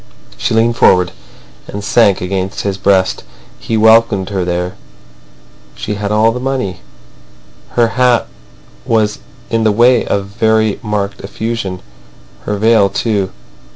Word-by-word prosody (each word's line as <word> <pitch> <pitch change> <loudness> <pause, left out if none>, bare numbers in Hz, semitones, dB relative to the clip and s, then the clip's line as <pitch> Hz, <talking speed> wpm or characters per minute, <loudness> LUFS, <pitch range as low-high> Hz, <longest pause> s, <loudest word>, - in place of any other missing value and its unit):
She 65 - -1
leaned 115 +1 +2
forward, 90 -1 +4 0.6
and 100 0 -6
sank 105 -2 +3
against 95 +2 -3
his 100 -1 -3
breast. 95 -1 +1 0.4
He 115 - -2
welcomed 110 -3 +4
her 95 -2 -1
there. 90 +1 -2 1.0
She 105 - -4
had 100 0 -3
all 110 +2 +3
the 125 - -4
money. 125 -9 -3 1.0
Her 120 -1 +4
hat 125 +1 +2 0.6
was 110 -2 0 0.3
in 115 -1 +1
the 110 - +3
way 120 +3 +4
of 100 -1 -1
very 110 +1 +1
marked 105 -3 -3
effusion; 105 -2 -4 0.6
her 105 - -2
veil 110 -1 +4
too. 100 -1 -1
105 Hz, 130 wpm, -14 LUFS, 100-115 Hz, 1.0 s, forward